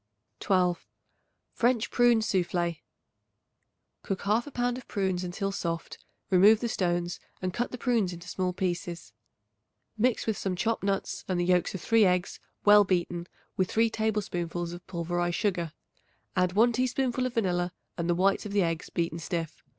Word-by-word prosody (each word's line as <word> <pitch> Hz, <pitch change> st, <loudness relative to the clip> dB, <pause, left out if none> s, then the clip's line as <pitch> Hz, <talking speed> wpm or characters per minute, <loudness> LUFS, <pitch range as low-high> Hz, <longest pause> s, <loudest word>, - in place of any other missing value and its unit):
12. 180 Hz, -3 st, +1 dB, 0.7 s
French 240 Hz, -1 st, +1 dB
Prune 240 Hz, -2 st, +4 dB
Soufflé. 175 Hz, -5 st, 0 dB, 1.2 s
Cook 195 Hz, -, -3 dB
1/2 225 Hz, +7 st, 0 dB
pound 245 Hz, 0 st, -1 dB
of 255 Hz, -, -15 dB
prunes 190 Hz, -3 st, -1 dB
until 195 Hz, +3 st, -2 dB
soft; 165 Hz, -4 st, -4 dB, 0.3 s
remove 200 Hz, +4 st, +7 dB
the 235 Hz, -, -1 dB
stones 175 Hz, -4 st, -1 dB, 0.2 s
and 185 Hz, -1 st, -3 dB
cut 240 Hz, +5 st, -1 dB
the 250 Hz, -, -6 dB
prunes 235 Hz, -7 st, +1 dB
into 175 Hz, 0 st, -9 dB
small 185 Hz, 0 st, -1 dB
pieces. 175 Hz, -, -3 dB, 0.9 s
Mix 245 Hz, +1 st, +2 dB
with 220 Hz, -3 st, -1 dB
some 190 Hz, -2 st, -1 dB
chopped 225 Hz, +5 st, 0 dB
nuts 195 Hz, 0 st, -1 dB
and 185 Hz, -2 st, 0 dB
the 175 Hz, -, +1 dB
yolks 180 Hz, +1 st, +2 dB
of 185 Hz, -, -5 dB
3 225 Hz, +3 st, +4 dB
eggs 180 Hz, -1 st, +1 dB, 0.3 s
well 205 Hz, 0 st, +8 dB
beaten 175 Hz, -2 st, -1 dB, 0.3 s
with 185 Hz, -1 st, +1 dB
3 225 Hz, 0 st, +2 dB
tablespoonfuls 175 Hz, -6 st, -2 dB
of 175 Hz, -, -10 dB
pulverized 175 Hz, 0 st, -1 dB
sugar. 180 Hz, -6 st, 0 dB, 0.6 s
Add 180 Hz, 0 st, +2 dB
1 230 Hz, +4 st, +5 dB
teaspoonful 255 Hz, +1 st, 0 dB
of 250 Hz, -, -8 dB
vanilla 180 Hz, -5 st, +1 dB, 0.2 s
and 170 Hz, 0 st, -2 dB
the 175 Hz, -, +3 dB
whites 195 Hz, +3 st, +2 dB
of 200 Hz, -, -7 dB
the 200 Hz, -2 st, +3 dB
eggs 165 Hz, 0 st, -2 dB
beaten 170 Hz, -1 st, -2 dB
stiff. 165 Hz, -1 st, -4 dB
185 Hz, 160 wpm, -28 LUFS, 175-220 Hz, 1.2 s, well